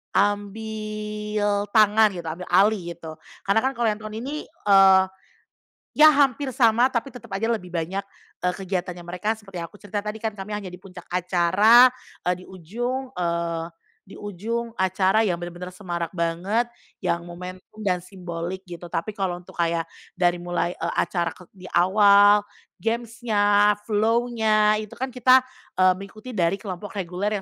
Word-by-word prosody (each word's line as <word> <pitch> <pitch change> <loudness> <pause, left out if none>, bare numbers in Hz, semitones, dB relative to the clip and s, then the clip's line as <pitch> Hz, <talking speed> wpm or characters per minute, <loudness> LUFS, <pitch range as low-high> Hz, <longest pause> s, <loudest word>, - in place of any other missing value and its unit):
ambil 210 0 -1
tangan 215 0 +6
gitu, 175 - -6
ambil 165 +3 -6
alih, 185 -2 +2
gitu. 160 -1 -10 0.2
Karena 200 +3 +3
kan 265 +3 -1
kalau 240 - -2
yang 210 - -5
tahun 215 0 -8
ini, 295 +3 -5
eee, 195 - +5 0.9
ya 305 +1 +7
hampir 275 -2 +2
sama, 235 0 +4
tapi 260 +1 -3
tetap 245 -2 -12
aja 225 +4 0
lebih 215 -6 -3
banyak 175 +2 -3 0.4
e - - -1
kegiatannya 180 -2 -4
mereka 180 +6 -2
seperti 195 -4 -10
yang 170 - -4
aku 205 - -20
cerita 205 0 -5
tadi, 210 +1 -6
kan 220 - 0
kami 210 0 -6
hanya 200 -3 -6
di 180 - -10
puncak 185 -2 -12
acara, 185 +7 +5 0.3
e - - 0
di - - -12
ujung, 240 +9 -4
eee, 170 -3 -2 0.4
di - - -12
ujung 225 +4 -4
acara 190 +2 +2
yang 180 - +1
bener-bener 175 +1 -7
semarak 175 -3 -4
banget, 185 +8 -1 0.3
yang 170 0 -1
momentum 180 +4 -10
dan 185 -3 +1
simbolik 180 0 -6
gitu. 175 -2 -9
Tapi 170 +4 -3
kalau 185 -4 -3
untuk 175 - -16
kayak 170 -1 +1 0.3
dari 175 -1 +2
mulai 175 0 -1
e 165 - -2
acara 170 -1 -1
kek 180 - -17
di 185 -2 -12
awal, 205 +2 +6 0.4
games-nya, 220 -3 +2
flow-nya, 220 -1 +2
itu 215 -1 -8
kan 260 +1 -4
kita, 255 +1 +5 0.3
eee, 185 0 +5
mengikuti 215 +5 -10
dari 180 -5 +1
kelompok 200 0 -7
reguler 195 +2 -2
200 Hz, 160 wpm, -24 LUFS, 180-220 Hz, 0.9 s, ya